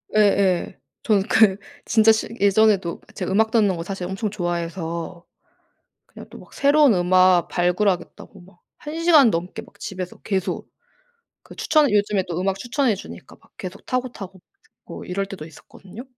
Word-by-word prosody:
예예. 200 -4 +2 0.2
저는 205 -4 +2
그 205 -2 +4 0.3
진짜 225 -1 +4
실 220 - -1
예전에도 200 -3 +2
그 - - -22
제가 190 -1 -4
음악 220 +2 +2
듣는 210 -5 +2
거 165 - -5
사실 185 -1 -5
엄청 195 +3 -3
좋아해서 170 -2 -5 0.8
그냥 - - -13
또 - - -12
막 - - -17
새로운 285 -3 +4
음악 185 0 +3
발굴하겠다고 180 +1 -2
막 175 -1 -20 0.2
1 300 +2 -7
시간 310 -8 +6
넘게 175 0 -4
막 - - -20
집에서 185 -2 -7
계속 195 -3 -3 0.7
그 - - -15
추천 305 -3 +2
요즘에 205 -2 +1
또 170 -1 -4
음악 195 0 -1
추천해 245 -1 0
주니까 - - -12
막 - - -26
계속 185 +1 -9
타고, 255 -1 -2
타고 190 -4 -11 0.4
뭐 - - -10
이럴 195 +2 -3
때도 195 -6 -9
있었거든요. 190 +7 -13
195 Hz, 320 characters per minute, -22 LUFS, 180-220 Hz, 0.8 s, 시간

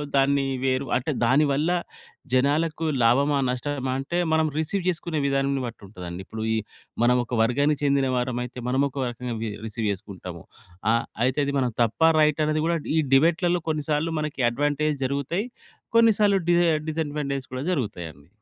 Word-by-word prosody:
దాన్ని 140 0 +3 0.2
వేరు 130 +1 +1
అంటే 135 +5 -2
దాని 135 +6 +4
వల్ల 150 +4 +1 0.6
జనాలకు 155 +5 +1 0.2
లాభమా, 140 +5 +3
నష్టమా 130 +1 -2
అంటే 155 +6 -3 0.2
మనం 160 0 +3
రిసీవ్ 175 +4 -1
చేసుకునే 170 -2 -2
విధానాన్ని 135 -1 0
బట్టి 115 -1 -8
ఉంటదండి. 90 -2 -7
ఇప్పుడు 110 +2 -6
ఈ - - +1 0.5
మనం 125 +1 +4
ఒక 120 - -4
వర్గానికి 140 +5 +1
చెందిన 140 -1 +2
వారమైతే 125 0 -3
మనము 135 +2 +2
ఒక 135 -1 -3
రకంగా 120 0 -5
వి 115 - -2 0.2
రిసీవ్ 110 0 -3
చేసుకుంటాము. 95 -4 -8 0.5
ఆహ్, 115 - +1 0.2
అయితే 130 +3 +1
అది 140 - -1
మనం 125 -2 0
తప్ప, 115 +7 -3 0.2
రైటా 150 0 +3
అన్న‌ది 155 0 0
కూడా 170 0 +1 0.2
ఈ - - +5 0.2
డిబేట్‌‌లలో 170 +4 +3
కొన్నిసార్లు 155 +1 -1
మనకి 150 -3 -3
అడ్వాంటేజ్ 145 +3 0
జరుగుతాయి. 140 - -2 0.5
కొన్ని 230 -1 +6
సార్లు 200 -2 +4
డిస 175 0 +5 0.3
డిసాడ్వాంటేజస్ 145 -4 -3
కూడా 130 +3 -3
జరుగుతాయండి. 85 - -5
140 Hz, 155 wpm, -25 LUFS, 125-155 Hz, 0.6 s, కొన్ని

